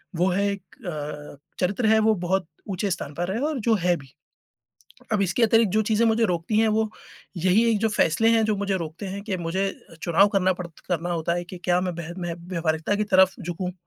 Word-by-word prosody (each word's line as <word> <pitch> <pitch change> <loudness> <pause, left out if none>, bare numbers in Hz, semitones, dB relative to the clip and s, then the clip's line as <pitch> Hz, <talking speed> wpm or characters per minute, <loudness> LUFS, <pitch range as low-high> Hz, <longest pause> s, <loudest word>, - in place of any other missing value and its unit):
वो 175 +3 +2
है 200 +2 +1
एक 200 - -8 0.3
अ, 150 -2 -6 0.2
चरित्र 200 +5 +1
है 220 0 +5
वो 220 0 +3
बहुत 190 -1 0 0.2
ऊँचे 195 +1 -1
स्थान 150 -4 -4
पर 175 +4 -2
है 225 - -2
और 295 - -2
जो 225 0 +2
है 180 -2 +2
भी। 135 -2 -15 1.0
अब 210 - +2
इसके 195 +5 +1
अतिरिक्त 225 -2 +4
जो 215 +2 +3
चीज़ें 220 +2 +2
मुझे 225 +1 +2
रोकती 180 +2 -1
हैं 225 - +4
वो 220 0 +1 0.5
यही 185 +6 +3
एक 225 - +2
जो 225 - +2
फैसले 215 +2 +2
हैं 225 -1 +4
जो 215 -1 +1
मुझे 200 -1 -1
रोकते 165 +3 -6
हैं, 195 +1 -5
कि 195 -4 -2
मुझे 175 +3 -1 0.4
चुनाव 175 +4 +4
पड़ता 185 -2 +1 0.3
करना 175 -1 -1
होता 170 0 0
है 175 - -2
कि 180 +1 -9
क्या 180 0 +3
मैं 185 - -1
वह 170 +1 -6
मै 175 -1 -2
व्यवहारिकता 170 +1 -2
की 210 - 0
तरफ 190 -2 +4
झुकूँ 180 +1 -4
185 Hz, 215 wpm, -24 LUFS, 170-215 Hz, 1.0 s, है